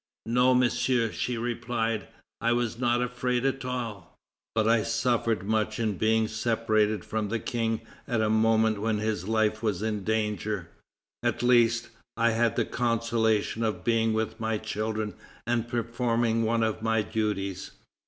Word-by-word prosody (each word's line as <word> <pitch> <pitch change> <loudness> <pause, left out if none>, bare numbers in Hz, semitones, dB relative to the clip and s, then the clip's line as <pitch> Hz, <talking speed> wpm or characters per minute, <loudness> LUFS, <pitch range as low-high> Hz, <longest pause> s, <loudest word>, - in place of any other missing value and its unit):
"No, 125 +2 +4
Monsieur," 125 -2 +2
she 125 -1 -2
replied, 115 -2 -2 0.3
"I 115 +1 +3
was 120 -1 -1
not 120 0 +2
at 125 - -3
all 125 0 +1 0.6
afraid; - - -26 0.5
but 110 -1 +2
I 115 0 +4
suffered 115 -4 0
much 110 +1 0
in 110 -4 0
being 110 0 +3
separated 110 -2 +1
from 110 -2 -2
the 115 - 0
King 115 -1 -1 0.3
at 120 -4 0
a 110 - +2
moment 110 -1 +3
when 110 0 +1
his 105 -3 -2
life 110 -1 +1
was 105 -3 -1
in 105 -2 -2
danger. 105 -4 -1 0.5
At - - -1
least, 120 -1 +4 0.3
I 115 0 +3
had 115 0 +1
the - - +1
consolation 115 -2 0
of 110 -2 -1
being 115 -1 +2
with 110 +1 -2
my 110 -1 0
children 110 0 -3 0.3
and 120 -1 0
performing 115 -1 0
one 115 0 +1
of 110 0 -1
my 110 -1 +1
duties." 100 -4 -2
110 Hz, 155 wpm, -27 LUFS, 110-120 Hz, 0.6 s, No